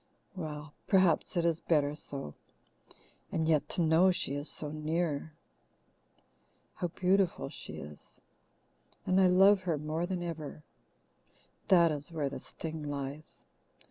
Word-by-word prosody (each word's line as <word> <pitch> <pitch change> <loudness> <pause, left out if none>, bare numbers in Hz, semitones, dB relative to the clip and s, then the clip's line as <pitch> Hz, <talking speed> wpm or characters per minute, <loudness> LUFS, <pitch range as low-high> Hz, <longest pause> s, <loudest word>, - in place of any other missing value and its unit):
Well, 150 -4 -6
perhaps 185 -1 +3
it 170 - +2
is 165 -1 +2
better 145 -3 +2
so. 140 - -5 1.0
And 160 -1 0
yet 150 -2 +2
to 175 - +2
know 165 +4 +5
she 175 -6 0
is 145 +2 -3
so 150 -1 -4
near! 155 0 -2 1.4
How 175 - -2
beautiful 180 - +1
she - - -8
is! 75 +1 -11 0.9
And 185 +1 +3
I 185 - +6
love 195 +2 +6
her 170 -4 -1
more 155 +4 -2
than 180 -2 -3
ever. 155 -3 -6 1.0
That 170 -4 +6
is 150 +3 -5
where 150 -4 -1
the 140 - -6
sting 160 -1 -6
lies. 140 +1 -6
160 Hz, 135 wpm, -31 LUFS, 150-175 Hz, 1.4 s, I